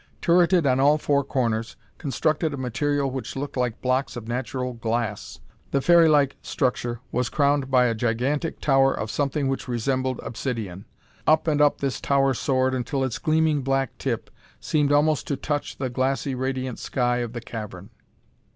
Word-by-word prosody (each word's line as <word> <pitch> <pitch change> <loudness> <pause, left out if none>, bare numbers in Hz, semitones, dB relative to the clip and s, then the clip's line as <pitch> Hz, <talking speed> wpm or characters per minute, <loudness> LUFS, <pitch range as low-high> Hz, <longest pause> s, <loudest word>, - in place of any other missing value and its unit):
Turreted 175 -1 +4
on 130 -1 +3
all 145 +3 +5
four 140 -2 +1
corners, 115 -4 -1 0.2
constructed 155 +1 0
of - - -7
material 140 +2 -1
which 130 -4 -5
looked 140 +1 -4
like 125 -3 -2
blocks 130 +2 0
of 115 -2 -7
natural 125 +1 -3
glass, 115 - -3 0.3
the 140 - +1
fairylike 155 -3 +4
structure 120 -2 -1
was 125 -1 0
crowned 140 -1 +1
by 130 -1 +4
a 115 - +2
gigantic 125 +8 -1
tower 135 -2 +4
of 110 - -4
something 140 0 0
which 135 0 -2
resembled 130 +1 -1
obsidian. 110 -6 -4 0.4
Up 155 +1 +4
and 150 -2 +2
up 145 -1 +3
this 135 -5 -2
tower 135 -1 +2
soared 130 +1 +1
until 130 +2 -1
its 120 -5 -2
gleaming 155 -2 +2
black 135 -1 -1
tip - - -3 0.3
seemed 145 -2 +1
almost 150 +1 +2
to 140 - 0
touch 145 -1 -3
the 130 - -2
glassy 135 +2 -1
radiant 130 -1 -3
sky 125 -1 0
of 120 -1 -3
the 120 - -4
cavern. 105 -3 -8
130 Hz, 165 wpm, -24 LUFS, 120-145 Hz, 0.4 s, all